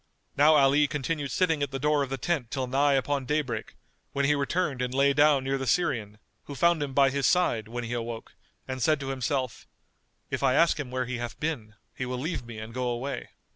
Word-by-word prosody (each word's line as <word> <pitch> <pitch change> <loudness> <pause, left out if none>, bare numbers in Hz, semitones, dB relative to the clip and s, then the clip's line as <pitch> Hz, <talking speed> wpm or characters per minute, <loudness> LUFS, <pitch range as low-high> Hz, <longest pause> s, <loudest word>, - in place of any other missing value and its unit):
Now 150 +2 +6
Ali 145 +1 +5
continued 145 0 -2
sitting 160 +2 +1
at 140 - 0
the 135 - -4
door 150 +2 +2
of 140 - -2
the 135 - -3
tent 135 -3 -1
till 130 -1 -2
nigh 140 +3 +2
upon 135 0 0
daybreak, 140 -7 -2 0.4
when 140 0 +1
he 150 - +4
returned 145 -1 -1
and 125 0 -1
lay 140 +2 +3
down 145 -1 +4
near 135 0 -1
the 135 - -3
Syrian, 120 - 0 0.3
who 145 - -7
found 170 +2 +3
him 140 -2 -3
by 135 -1 +5
his 140 -1 +1
side, 145 -12 +2
when 120 +2 -5
he 120 +1 -4
awoke, 115 -1 -5 0.3
and 130 -1 -4
said 155 +4 +3
to 135 - -4
himself, 130 -1 -2 0.6
"If - - -2
I 130 - +3
ask 165 0 +4
him 140 -4 -4
where 130 0 -2
he 125 -1 -4
hath 120 0 -6
been, 120 -9 -3 0.2
he 130 - -4
will 125 0 -3
leave 155 +2 -3
me 115 -2 -9
and 110 +1 -8
go 125 0 -2
away." 120 +4 -4
135 Hz, 225 wpm, -27 LUFS, 125-145 Hz, 0.6 s, Now